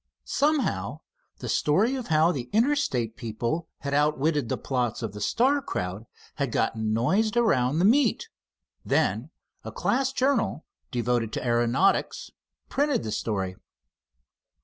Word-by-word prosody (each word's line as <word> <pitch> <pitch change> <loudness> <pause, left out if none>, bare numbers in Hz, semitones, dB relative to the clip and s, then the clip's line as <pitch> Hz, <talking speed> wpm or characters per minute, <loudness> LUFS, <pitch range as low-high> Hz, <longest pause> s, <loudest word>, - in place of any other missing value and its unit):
Somehow 295 0 0 0.4
the - - -7
story 195 - +2
of 260 -3 -4
how 160 +1 +4
the 125 -7 -5
Interstate 220 - +1
people 120 +7 -3
had 140 -1 -3
outwitted 150 -2 +1
the - - -1
plots 125 -3 -2
of 110 -3 -4
the 105 - -8
Star 265 - +2
crowd 95 - -4 0.3
had 140 -5 -1
gotten 110 -1 0
noised 195 - +1
around 145 - +2
the 175 - +3
meet. 285 - +3 0.6
Then - - 0 0.3
a - - -6
class 265 +2 0
journal 260 - 0 0.2
devoted 120 -3 0
to - - -3
aeronautics 120 - +1 0.4
printed 285 - 0
the 110 - -4
story. 95 -5 -2
145 Hz, 130 wpm, -26 LUFS, -, 0.6 s, how